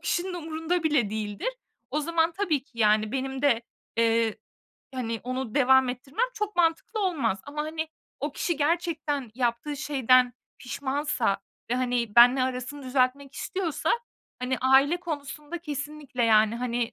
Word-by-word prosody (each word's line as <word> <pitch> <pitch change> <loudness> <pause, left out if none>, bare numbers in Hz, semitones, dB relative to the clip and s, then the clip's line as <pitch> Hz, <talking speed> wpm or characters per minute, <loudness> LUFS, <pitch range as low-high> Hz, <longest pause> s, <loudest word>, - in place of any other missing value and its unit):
kişinin 350 +2 -1
umurunda 325 +1 -2
bile 280 -10 +2
değildir. 210 - -3 0.4
O 300 - 0
zaman 330 +1 +1
tabii 330 -8 0
ki 260 -5 -19
yani 215 0 +3
benim 265 0 -3
de, 240 -5 +3 0.3
eee, 230 -1 +2 0.6
hani, 230 -3 -3
onu 255 -2 -3
devam 265 -2 +5
ettirmem 270 - -1
çok 420 -3 -3
mantıklı 345 +6 +1
olmaz. 285 - 0
Ama, 300 +1 -3
hani, 315 +1 -3 0.3
o 290 0 -2
kişi 340 +2 -1
gerçekten 300 -5 -1
yaptığı 245 +4 -1
şeyden 255 -3 +3 0.3
pişmansa 265 -4 -1 0.3
ve, 245 - +2
hani, 245 -3 -1
benimle 250 +2 +8
arasını 255 +2 -3
düzeltmek 260 +1 0
istiyorsa, 370 -5 -2 0.5
hani, 250 0 -1
aile 270 +5 +5
konusunda 300 -1 -6
kesinlikle 295 -4 -4
yani, 220 0 +4
hani, 240 -1 -1
270 Hz, 140 wpm, -27 LUFS, 245-315 Hz, 0.6 s, benimle